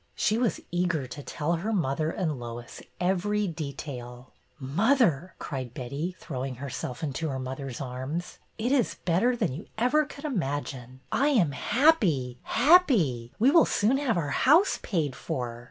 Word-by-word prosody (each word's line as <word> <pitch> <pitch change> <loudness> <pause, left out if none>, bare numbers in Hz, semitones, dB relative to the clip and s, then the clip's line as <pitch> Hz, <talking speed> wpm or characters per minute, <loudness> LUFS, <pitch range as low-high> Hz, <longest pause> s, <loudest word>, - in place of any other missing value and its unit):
She 215 - +2
was 235 -1 +1
eager 175 -5 0
to 130 +3 -8
tell 150 +3 -2
her 205 +7 -2
mother 155 -5 0
and 160 -5 -2
Lois 120 0 -8 0.2
every 195 +3 +1
detail. 135 -6 -7
'' - - -39 0.2
Mother," 205 - +3
cried 130 -4 -5
Betty, 140 +8 -4
throwing 130 -4 -4
herself 130 0 -5
into 155 +2 -2
her 135 - -3
mother's 130 -1 -5
arms, 135 +6 -5 0.2
it 235 +3 -1
is 265 -6 +2
better 190 +9 +3
than 210 - -1
you 160 +9 -8
ever 265 +7 +3
could 285 +1 -10
imagine! 135 - -3
I 275 - +2
am 215 - +3
happy, 165 - +2
happy! 225 - +4
We 250 +6 +5
will 330 - +6
soon 225 +6 +2
have 250 -9 +1
our 150 -4 -1
house 315 - +4
paid 155 - -1
for." 120 -2 -4
160 Hz, 155 wpm, -27 LUFS, -, 0.2 s, will